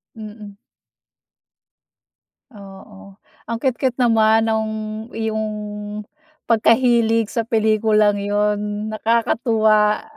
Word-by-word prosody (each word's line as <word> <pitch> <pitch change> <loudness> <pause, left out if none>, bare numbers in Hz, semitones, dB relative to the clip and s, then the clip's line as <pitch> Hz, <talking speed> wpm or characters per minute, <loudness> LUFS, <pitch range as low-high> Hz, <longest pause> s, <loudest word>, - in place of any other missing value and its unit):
Mhm 210 -2 -10 2.0
Oo. 195 -1 -14 0.3
Ang 230 - -3
cute-cute 260 -1 -1
naman 225 -2 +3
nung 220 0 -1 0.4
iyong 220 -1 -2 1.0
pagkahilig 230 -1 +2
sa 230 -1 -2
pelikulang 215 -2 +2
'yon. 210 +1 -2
Nakakatuwa, 220 -1 +1
220 Hz, 70 wpm, -20 LUFS, 210-230 Hz, 2.0 s, naman